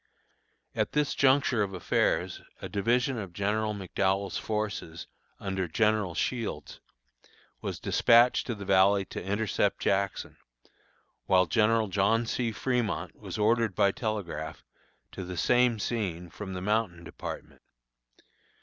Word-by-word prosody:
At - - -1
this 150 -1 +1
juncture 130 -4 +3
of 95 -2 -2
affairs, 90 - 0 0.2
a - - -6
division 120 +6 +1
of 95 -4 -7
General 105 +3 0
McDowell's 95 0 -1
forces, 105 -6 -3 0.3
under 95 -2 -2
General 105 0 +1
Shields, 115 - -3 0.8
was - - -4
dispatched 120 +1 +4
to 120 - -2
the 100 -1 -8
valley 100 +1 +4
to - - -7
intercept 100 +2 0
Jackson, 100 -1 -1 0.9
while 90 -1 +5
General 110 +2 +2
John 100 +5 +2
C. 115 0 -1
Fremont 120 0 -2
was - - -7
ordered 110 -1 +2
by 100 - +4
telegraph 85 - -4 0.5
to 95 - -6
the 90 0 -6
same 120 +5 +3
scene 95 -7 -3
from 100 -2 -7
the 90 - -4
Mountain 105 -5 0
Department. - - -8
105 Hz, 125 wpm, -29 LUFS, 95-115 Hz, 0.9 s, while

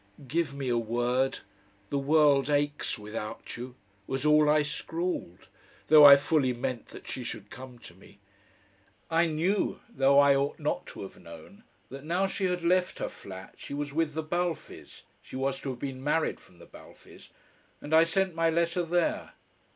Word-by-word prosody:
"Give 160 +1 0
me 140 -2 -4
a 120 -1 +1
word 120 +3 0 0.5
the 140 - 0
world 145 -1 +3
aches 145 -2 0
without 105 0 -7
you," 125 +1 -8 0.3
was 135 +2 -3
all 150 0 +5
I 150 0 +4
scrawled, 160 - -4 0.4
though 150 -1 +9
I 140 -1 +12
fully 140 -2 +1
meant 120 0 -4
that - - -12
she 130 - -5
should 105 -4 -7
come 130 -1 -10
to 100 - -14
me. 95 +2 -19 0.9
I 165 +1 +3
knew, 170 +6 0
though 140 - +3
I 140 -1 +6
ought 140 +1 -1
not 150 -1 -3
to - - -8
have 95 - -11
known, 190 - -13 0.3
that 135 +1 -8
now 175 +5 0
she 195 0 -2
had 180 -1 -1
left 180 +1 +1
her - - -3
flat, 95 0 -11
she 140 - -7
was 145 -1 -4
with 155 -1 -1
the 160 - -2
Balfes 175 +1 -4 0.2
she - - -12
was 135 +1 -1
to 140 - -4
have 130 - -5
been 135 -1 -6
married 155 +2 0
from 90 - -21
the 85 - -14
Balfes - - -16 0.5
and 150 - -6
I 160 +1 +7
sent 185 +2 0
my 165 0 +1
letter 170 +2 +1
there. 175 0 -1
145 Hz, 180 wpm, -28 LUFS, 130-165 Hz, 0.9 s, I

